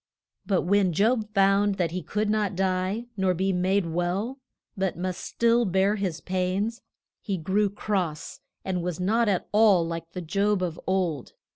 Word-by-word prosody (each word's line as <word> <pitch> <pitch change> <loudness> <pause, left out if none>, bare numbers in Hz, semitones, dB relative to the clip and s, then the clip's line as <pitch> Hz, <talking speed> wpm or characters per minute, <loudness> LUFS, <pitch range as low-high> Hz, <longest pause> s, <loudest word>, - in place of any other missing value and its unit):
But 190 -3 +2
when 190 -1 +2
Job 215 +3 +1
found 195 +1 +3
that 175 -4 -1
he 180 +1 -3
could 210 +5 -2
not 210 -2 0
die, 190 +4 -1
nor 190 -2 +1
be 190 +2 0
made 185 +2 +1
well, 180 +10 -2 0.4
but 190 -4 -1
must 185 0 -3
still 235 +1 +2
bear 190 0 +2
his 185 -6 -3
pains, 190 +5 -1 0.4
he 195 -4 -2
grew 195 +5 +1
cross, 190 -6 -3 0.3
and 185 -2 -1
was 175 -1 -3
not 220 +5 +2
at 190 -3 0
all 210 -5 +5
like 165 0 -6
the 180 - -4
Job 200 +3 0
of 170 -3 -3
old. 180 -8 -1
190 Hz, 165 wpm, -26 LUFS, 180-205 Hz, 0.4 s, all